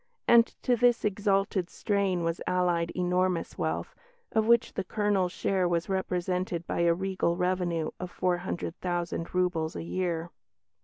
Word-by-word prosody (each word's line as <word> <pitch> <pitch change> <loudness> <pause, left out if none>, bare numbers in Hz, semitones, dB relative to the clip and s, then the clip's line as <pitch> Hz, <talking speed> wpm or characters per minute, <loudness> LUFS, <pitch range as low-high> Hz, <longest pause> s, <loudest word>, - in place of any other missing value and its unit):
And 235 -1 +7 0.2
to 250 - +3
this 240 -1 +3
exalted 195 -2 +1
strain 195 -4 0
was 165 +1 -1
allied 175 -2 +1
enormous 180 -1 0
wealth, - - -2 0.4
of 220 -1 +2
which 235 0 +4
the - - -2
Colonel's 200 -2 0
share 185 -1 0
was 170 +1 -1
represented 180 -2 -1
by - - -3
a 170 0 +4
regal 185 -2 -1
revenue 180 -3 0
of 180 - -5
four 180 0 0
hundred 175 -1 -4
thousand 175 -1 -3
roubles 175 -3 0
a - - -4
year. 170 -1 -2
180 Hz, 150 wpm, -28 LUFS, 175-195 Hz, 0.4 s, And